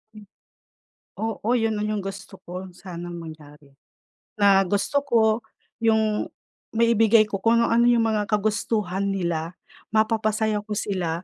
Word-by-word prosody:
Mm. 210 - -12 1.0
Oo, 220 0 -3
yun 225 -2 0
na 210 - -2
yung 215 -1 -1
gusto 195 0 -8
ko 180 +2 -7
sanang 175 -1 -8
mangyari. 150 -3 -13 0.6
Na 200 -1 +5
gusto 205 +9 0
ko 240 -5 +2 0.6
yung 220 -1 +2 0.5
maibigay 225 -1 +5
ko 200 -2 -4
kung 225 +4 +3
ano-ano 235 +1 +3
yung 235 -1 +4
mga 215 -2 0
kagustuhan 205 -2 -1
nila 175 -3 -2 0.4
mapapasaya 220 -1 +1
ko 210 - -3
sila 180 -5 -2
210 Hz, 130 wpm, -24 LUFS, 185-220 Hz, 1.0 s, Na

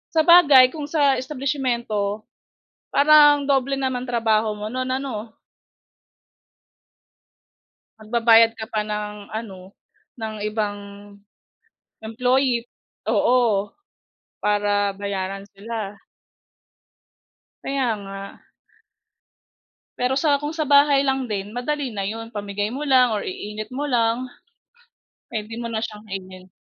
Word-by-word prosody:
Sabagay 310 -6 +7
kung 300 -2 -5
sa 285 -4 +3
establisimyento, 240 -7 -2 0.7
parang 290 -1 +6
doble 275 0 +1
naman 260 -2 -2
trabaho 220 -2 +1
mo 210 - -6
no'n 255 0 -3
ano? 230 -5 -6 2.7
Magbabayad 225 0 +4
ka 220 -1 -7
pa 215 - 0
ng 210 -1 -6
ano, 195 -4 -8 0.5
ng 220 -1 -4
ibang 210 -1 -2 1.3
employee, 250 +2 +1 0.5
oo. 220 -2 +2 0.7
Para 205 -1 +1
bayaran 195 -1 -4
sila. 205 -1 -6 1.6
Kaya 270 -2 -1
nga. 195 0 -8 1.8
Pero 250 +1 +1
sa 290 -3 +2
kung 295 +2 -5
sa 310 -2 -2
bahay 285 -1 +5
lang 270 -2 0
din, 205 -2 -4
madali 265 +4 -3
na 200 -3 -4
yun. 225 +2 -6
Pamigay 205 0 -3
mo 285 +4 -5
lang 255 -3 +5
or 205 - -2
iinit 210 +4 -6
mo 290 +3 -2
lang, 235 +1 +1 1.0
pwede 215 0 -5
mo 235 0 -4
na 220 - -1
siyang 215 -2 -6
kainin. 185 -2 -9
230 Hz, 105 wpm, -22 LUFS, 210-265 Hz, 2.7 s, Sabagay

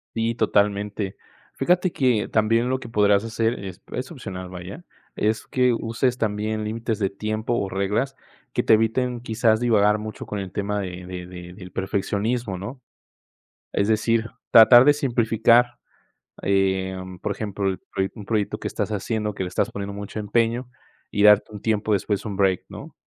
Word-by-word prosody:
Sí, 115 0 0
totalmente. 105 -2 0 0.4
Fíjate 180 +1 +2
que 125 -8 +1
también 115 +3 +2
lo 130 0 0
que - - -9
podrías 105 -2 +3
hacer, 115 -1 -1
es 95 -2 -8
es 130 +4 -4
opcional, 95 - -7
vaya, 90 - -8 0.3
es 110 +1 0
que 125 -1 +2
uses 115 +2 -1
también 110 0 -1
límites 110 0 -3
de 100 -2 +1
tiempo, 110 +3 -3
o 100 -5 -1
reglas 105 +8 -1 0.4
que - - +1
te - - +5
eviten, 120 +3 +1
quizás, 110 -1 +2
divagar 105 -3 +3
mucho 110 0 -7
con 105 - -4
el 95 -2 -6
tema 105 +2 -2
de 90 -2 -6
de 90 -1 -6
de 90 -1 -10
del 90 -1 -11
perfeccionismo, 100 +3 -1
¿no?, 125 +8 -7 0.9
es 100 - +1
decir, 110 +1 +1 0.2
tratar 120 +2 +9
de 145 - +7
simplificar, 120 -3 +3 0.7
eh 95 -1 +1 0.3
por 105 - -1
ejemplo, 100 -1 -2
el 95 -1 -2
pro 95 - -3
un 105 - -9
proyecto 105 -2 -1
que - - -4
estás - - -3
haciendo, 105 0 -2
que - - -4
le - - -3
estás 90 - -1
poniendo 100 0 -5
mucho 100 +1 -6
empeño, 115 +4 0 0.4
y 105 - 0
darte 105 0 +6
un 105 - -9
tiempo 110 -1 0
después, 100 0 -1
un 100 -2 -4
break, 95 -2 +2
¿no? - - -10
105 Hz, 170 wpm, -23 LUFS, 100-115 Hz, 0.9 s, tratar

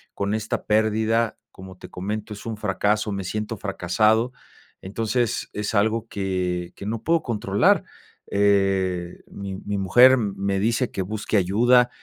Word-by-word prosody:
con 100 +1 -1
esta 110 0 -3
pérdida, 110 +1 +1
como 95 -1 -12
te - - -11
comento, 105 +3 -5
es 100 - -11
un 110 -2 -4
fracaso, 105 +1 0
me 100 -1 -3
siento 105 +4 -3
fracasado. 110 +4 +1 0.5
Entonces, 115 +4 -2
es 105 +1 -3
algo, 110 +2 +1
que, 90 -3 -3
que 100 - -8
no 110 0 -3
puedo 165 0 +2
controlar. 105 -5 +2 0.5
Eh, 95 -3 +1
mi 100 -1 -6
mi 100 +1 -4
mujer 120 +8 +6
me 100 -3 -1
dice: 115 +4 +1
"Que 95 - -3
busque 105 +3 -3
ayuda", 120 +6 +4
105 Hz, 145 wpm, -23 LUFS, 95-110 Hz, 0.5 s, mujer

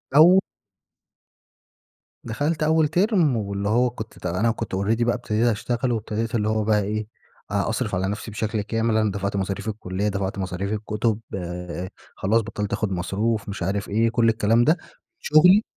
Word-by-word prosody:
أو 175 +5 +8 1.8
دخلت 145 +8 -1
أول 160 0 +3
تيرم، 175 - +2
واللي 100 -1 -2
هو 120 +3 +3
كنت 110 -2 -9
أت - - -13
أنا 95 +7 +1
كنت 115 -4 -4
already 110 +5 +1
بقى 120 0 +2
ابتديت 115 -1 0
اشتغل، 120 +3 0
وابتديت 115 +1 -2
اللي 105 -1 +1
هو 110 -1 +1
بقى 105 -1 +2
إيه، 105 +1 -3 0.4
أ - - 0
أصرف - - -1
على 95 +1 0
نفسي 105 +2 -4
بشكل 110 0 -2
كامل. 115 +1 0
أنا 110 -2 +2
دفعت 100 0 -3
مصاريف 100 +2 -2
الكلية، 100 -1 -3
دفعت 100 0 -2
مصاريف 95 +2 -3
الكتب، 110 +1 -1 0.2
آآ 90 0 -5 0.3
خلاص 110 +4 +2
بطلّت 105 -2 -4
أخُد 100 -1 -1
مصروف، 100 +4 -1
مش 100 -3 -4
عارف 100 +2 -2
إيه، 115 +3 +2
كل 115 0 +3
الكلام 115 +1 +3
ده. 160 +6 +4 0.4
شغلي 180 +8 +6
110 Hz, 165 wpm, -24 LUFS, 100-115 Hz, 1.8 s, أو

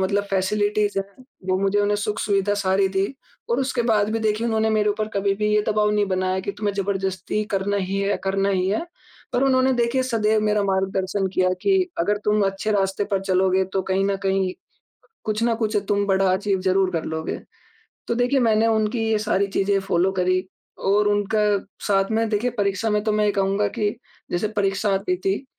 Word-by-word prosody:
मतलब 200 +2 +1
फैसिलिटीज़ 205 +1 +1
है 195 - -1 0.4
वो 185 0 +2
मुझे 195 +1 +1
उन्हें 205 0 +1
सुख-सुविधा 205 -1 0
सारी 195 -1 +2
दी 190 +1 0 0.4
और 235 +3 +2
उसके 260 -2 0
बाद 215 -3 +2
भी 225 - 0
देखिए 220 +1 0
उन्होंने 220 -1 +1
मेरे 215 -1 +2
ऊपर 215 +1 -2
कभी 200 0 +1
भी 210 +1 -1
ये 210 - +3
दबाव 210 -1 +2
नहीं 210 -1 +1
बनाया 185 0 0
कि 200 - -4
तुम्हें 205 -1 -1
ज़बरदस्ती 195 0 -2
करना 200 +1 0
ही 195 0 -2
है 200 +1 0
करना 195 +1 +1
ही 185 -1 +1
है। 215 +12 0 0.5
पर 250 +1 +1
उन्होंने 260 -1 +3
देखिए 240 +1 +1
सदैव 220 -4 +1
मेरा 210 -1 +2
मार्गदर्शन 190 0 0
किया 185 0 +2
कि 385 -2 +2
अगर 205 +5 +1
तुम 210 0 +2
अच्छे 195 +2 -2
रास्ते 195 0 0
पर 195 -1 +1
चलोगे 190 0 +2
तो 190 - 0
कहीं 190 +1 0
न 200 0 0
कहीं, 190 -1 +1 0.7
कुछ 215 +1 -1
ना 235 0 +2
कुछ 220 -1 -1
तुम 205 0 +2
बड़ा 195 -1 +3
अचीव 195 0 0
ज़रूर 190 0 +2
कर 165 -3 -2
लोगे। 160 0 -4 0.7
तो 235 - 0
देखिए 250 +3 +2
मैंने 225 -1 +3
उनकी 220 +1 +1
ये 220 - +3
सारी 200 -2 +1
चीज़ें 195 0 +1
फॉलो 190 -1 +1
करी 185 0 +2 0.5
और 205 +1 +3
उनका 205 +1 +1 0.5
साथ 195 0 +2
में 225 +1 +1
देखिए 215 +3 0
परीक्षा 200 +2 0
में 210 0 +1
तो 215 - +1
मैं 210 0 +2
ये 205 - +3
कहूँगा 200 +1 +1
कि 210 -2 0 0.4
जैसे 175 +5 0
परीक्षा 205 -1 0
आती 190 -1 0
थी, 195 +7 -2
205 Hz, 195 wpm, -23 LUFS, 195-215 Hz, 0.7 s, ये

